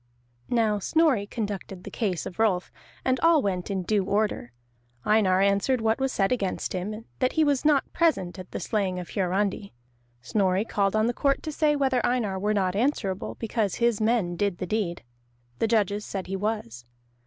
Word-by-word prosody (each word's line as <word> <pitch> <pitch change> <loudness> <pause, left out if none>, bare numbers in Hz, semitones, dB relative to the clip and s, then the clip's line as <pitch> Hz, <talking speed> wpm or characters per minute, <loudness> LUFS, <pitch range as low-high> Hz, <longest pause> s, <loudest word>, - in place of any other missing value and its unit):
Now 220 -3 +2
Snorri 265 - +2
conducted 200 -4 -5
the - - -8
case 195 -7 -2
of 180 - -8
Rolf, 195 -5 +1 0.3
and 260 0 +2
all 330 -4 +4
went 185 -2 -2
in 190 -2 -1
due 205 +1 +1
order. 200 - -1 0.5
Einar 195 -3 +3
answered 200 +6 +2
what 225 +2 +1
was 265 0 0
said 195 -2 +1
against 200 -7 -1
him, 210 +5 -4
that 255 -1 +1
he 320 - +3
was 285 -3 +2
not 295 -2 +2
present 190 - +1
at 185 - -9
the - - -5
slaying 195 -4 -1
of 180 -1 -6
Hiarandi. 195 +1 -1 0.5
Snorri 190 - +1
called 200 -2 0
on 215 0 +3
the 240 - +1
court 275 +2 +1
to 310 - -3
say 300 0 +2
whether 265 -3 +1
Einar 220 -6 0
were 210 +2 0
not 190 -2 +1
answerable, 205 -5 -1
because 220 -3 -1
his 235 -3 +1
men 215 -6 +1
did 200 -1 0
the 185 - -3
deed. 180 - -2 0.6
The - - +2
judges 210 -2 +1
said 195 -3 -5
he 195 - -4
was. 195 - -3
210 Hz, 185 wpm, -26 LUFS, 190-240 Hz, 0.6 s, all